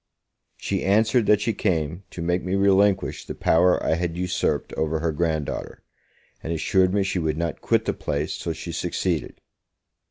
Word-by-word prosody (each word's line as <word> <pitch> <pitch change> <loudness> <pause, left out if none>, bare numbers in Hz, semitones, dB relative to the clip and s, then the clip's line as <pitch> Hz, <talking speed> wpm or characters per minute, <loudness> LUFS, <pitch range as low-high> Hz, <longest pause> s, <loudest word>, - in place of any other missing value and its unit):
She - - -2
answered, 110 +3 +3
that 105 -1 +4
she 115 +1 0
came 85 -4 -1
to 85 - -6
make 90 +1 0
me 90 +1 -1
relinquish 100 0 +2
the - - -7
power 90 +2 +3
I - - +2
had 85 0 -2
usurped 90 -5 -1
over 80 0 -1
her 80 0 0
grand 80 -1 0
daughter; - - -6 0.6
and 80 - -5
assured 90 +3 +2
me 100 0 +2
she 95 -1 -1
would 80 -2 -1
not 85 0 -3
quit - - +1
the - - 0
place 75 +1 -3
till 85 - -3
she 80 +2 -7
succeeded. 85 -3 -2
85 Hz, 180 wpm, -24 LUFS, 80-95 Hz, 0.6 s, that